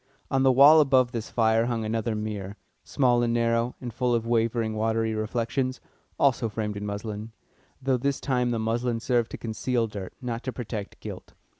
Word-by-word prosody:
On 135 - +2
the 135 0 +5
wall 140 +5 +8
above 130 -3 +3
this 115 -2 -4
fire 115 0 +2
hung 115 -2 -1
another 110 +1 -1
mirror, 105 -2 -5 0.3
small 125 -4 +2
and 120 -1 +1
narrow, 115 +1 +1
and 120 -3 -6
full 125 0 +1
of 115 -1 -1
wavering, 115 -1 +1
watery 110 +1 0
reflections, 120 +4 -2 0.4
also 125 -4 +2
framed 105 0 -3
in 105 0 -4
muslin, 105 +2 -5 0.5
though 135 -1 +1
this 140 +2 -1
time 125 -3 0
the 120 - 0
muslin 115 +1 -1
served 120 -1 +1
to - - -6
conceal 115 +1 -1
dirt, 100 -4 -7
not 120 -3 -4
to 130 - -4
protect 110 -5 -6
gilt. - - -9
115 Hz, 180 wpm, -26 LUFS, 110-125 Hz, 0.5 s, wall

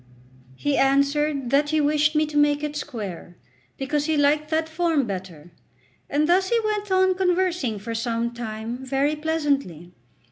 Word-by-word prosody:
He 290 - -1
answered 280 -1 +1
that 290 +1 +3
he 310 0 +1
wished 300 +1 +2
me 305 0 +3
to 300 0 -9
make 290 0 +3
it 300 0 -3
square, 205 - -6 0.4
because 290 +2 -1
he 315 -1 +1
liked 295 +1 +2
that 320 0 0
form 320 -3 0
better; 180 -5 -7 0.6
and 300 +2 +1
thus 375 +2 +3
he 470 - +3
went 420 -2 -2
on 375 0 +4
conversing 360 - 0
for 225 +3 -6
some 230 +1 -2
time 230 +1 -6
very 275 +3 0
pleasantly. 285 - -2
290 Hz, 155 wpm, -24 LUFS, 240-315 Hz, 0.6 s, on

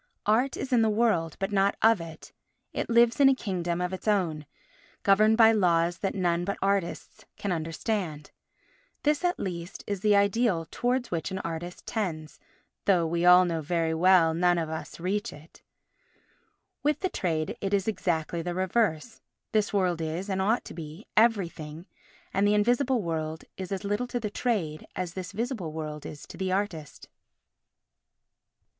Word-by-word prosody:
Art 235 +6 +2
is 265 -1 -3
in 240 - +5
the 220 - +3
world 210 -8 +1
but 195 +1 -2
not 200 0 +2
of 225 -4 +5
it; 160 -1 -10 0.4
it - - -3
lives 235 +1 +4
in 275 -1 +7
a 270 - +4
kingdom 175 -7 -2
of 180 +1 -2
its 190 - -7
own, 165 -8 0 0.6
governed 215 +3 +5
by 225 -1 +7
laws 175 -4 +2
that 195 - -2
none 175 -2 +1
but 200 +2 -2
artists 195 -3 -2
can 200 - -3
understand. 165 -1 -3 0.7
This, 300 +2 +1
at 355 0 +1
least, 175 -1 -5
is 200 -2 -3
the 210 +1 +3
ideal 200 -3 +2
towards 245 +1 -1
which 165 0 -2
an 190 - -4
artist 170 +1 -6
tends, 160 -8 -4 0.5
though 180 -4 +3
we 170 +1 0
all 180 +1 +8 0.2
very 165 +1 0
well 170 -1 +5
know - - -4
we - - -3
none 175 -1 +4
of 160 -2 -2
us 160 +1 -6
reach 195 +4 -2
it. 155 +3 -15 1.2
With 295 +1 0
the 375 - +1
trade 160 - -2
it 195 - -2
is 200 -1 +1
exactly 170 -5 -1
the 175 +1 -4
reverse; 190 +1 0 0.3
this 215 -2 +1
world 180 -4 +1
is, 165 +5 -3
and 190 0 0
ought 220 +5 +1
to - - -8
be, 160 +4 -9
everything, 175 -8 +1 0.5
and 195 +1 +3
the 210 - +3
invisible 245 +3 +2
world 160 -1 -3
is 190 0 -7
as 195 +1 -3
little 205 +5 -1
to 245 - -3
the 210 -3 -4
trade 190 -12 -2
as 180 -2 -3
this 185 +1 -6
visible 220 - -3
world 155 -1 -6
is 150 - -9
to - - -11
the 190 0 -2
artist. 185 -7 -3
185 Hz, 175 wpm, -27 LUFS, 165-215 Hz, 1.2 s, all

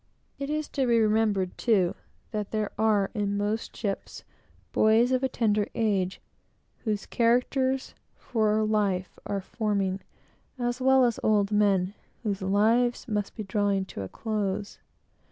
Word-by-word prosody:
It 280 0 -3
is 305 0 -1
to 270 -3 0
be 235 -1 +4
remembered, 215 -4 +1
too, 195 -7 +3 0.4
that 210 -3 -3
there 215 -2 -2
are, 210 -2 +2
in 205 -2 -1
most 210 +2 -2
ships, 200 -3 -4 0.5
boys 225 +3 +4
of 255 0 +2
a 265 - +1
tender 210 -4 +1
age, 195 -5 0 0.7
whose 210 -2 -1
characters 260 +3 +1 0.2
for 215 -2 +1
life 200 -4 0
are 200 -1 -2
forming, 200 -2 -1 0.6
as 245 +1 -2
well 265 0 +5
as 235 -2 0
old 210 -1 +2
men, 200 -2 +2 0.3
whose 200 -3 -2
lives 225 +7 +2
must 210 -3 -2
be 215 - -4
drawing 200 -1 0
toward 100 - -6
a - - -9
close. 205 -2 -3
215 Hz, 140 wpm, -27 LUFS, 200-235 Hz, 0.7 s, well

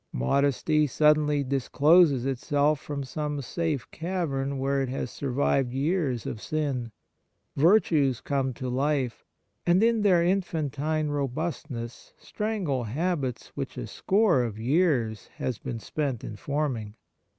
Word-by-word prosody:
Modesty 140 - +2
suddenly 150 0 +3
dis 135 -1 -2
closes 150 -4 +5
itself 145 +3 +1
from 140 0 -5
some 150 +2 -3
safe 150 0 -2
cavern 155 -6 -2
where 135 +1 0
it 135 - -2
has 130 -1 -3
survived 135 -1 0
years 140 - 0
of 110 - -5
sin. 140 -7 -2 0.6
Virtues 150 - +3
come 135 -2 -1
to 130 - -5
life, 135 0 -1 0.4
and 180 +4 +3
in 230 -1 +3
their 185 -5 +4
infantine 155 -4 0
robust 145 +3 -3
ness 120 -2 -7
strangle 195 - -2
habits 140 +1 -2
which - - -5
a - - -4
score 195 - +2
of 115 -4 -3
years 125 - +1
has 125 -4 -3
been 120 - -5
spent 135 -1 -3
in 105 - -6
forming. 125 -4 -3
140 Hz, 130 wpm, -27 LUFS, 130-155 Hz, 0.6 s, closes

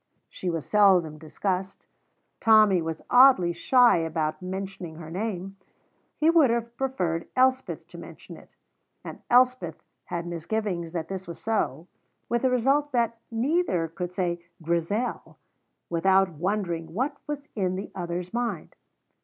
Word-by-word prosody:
She 185 - -4
was 165 -3 -3
seldom 185 -7 +4
discussed. 190 +4 -3 0.5
Tommy 215 -5 +5
was 160 0 -5
oddly 245 -9 +6
shy 245 +7 +4
about 160 -2 -2
mentioning 190 -2 -6
her 160 -1 -9
name; 195 0 -4 0.6
he 315 +2 +4
would 320 -6 +5
have 235 0 -2
preferred 180 -11 -2
Elspeth 260 +1 +1
to - - -11
mention - - -11
it: - - -16 0.5
and - - -9
Elspeth 250 -9 +3 0.2
had 170 -1 -4
misgivings 175 0 -3
that 165 -2 -3
this 190 0 -6
was 170 - -8
so, 175 -9 -1 0.4
with 235 0 +1
the 260 - +3
result 270 +4 +2
that 235 -1 0
neither 235 - 0
could 175 +2 -5
say 175 -2 -2 0.2
"Grizel" 170 +8 -2 0.5
without 190 +3 +3
wondering 170 -1 -3
what 275 +6 -1
was 290 -1 -4
in 185 -3 0
the 195 - -6
other's 175 +1 -5
mind. 235 -8 -3
190 Hz, 135 wpm, -26 LUFS, 170-235 Hz, 0.6 s, oddly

